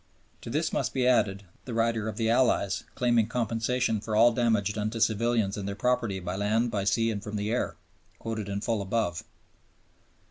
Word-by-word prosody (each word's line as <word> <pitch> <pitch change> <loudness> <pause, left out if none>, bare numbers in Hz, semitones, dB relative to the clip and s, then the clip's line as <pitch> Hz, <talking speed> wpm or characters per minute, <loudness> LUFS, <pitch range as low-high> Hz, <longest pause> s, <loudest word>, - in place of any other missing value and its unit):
To - - -8
this 155 +6 -1
must - - -1
be 130 -2 +1
added 100 -6 +2 0.2
the 120 - -5
rider 115 -1 +1
of - - -7
the 115 -2 0
Allies, 115 -4 +2
claiming 120 -3 +2
compensation 115 -1 0
for 110 0 -3
all 115 +3 +6
damage 110 -4 +1
done 105 0 -2
to 115 +1 -5
civilians 110 -2 +1
and 100 -1 -4
their 100 - -3
property 120 -3 0
by 90 0 -4
land, 110 +4 +1
by 100 -3 -1
sea, 115 +3 +2
and 105 -2 -4
from 105 -1 -6
the 105 +1 -2
air 120 - -1 0.4
(quoted 110 -3 -4
in 100 0 -3
full 110 -1 -1
above). 95 -3 -1
110 Hz, 190 wpm, -28 LUFS, 100-120 Hz, 0.4 s, all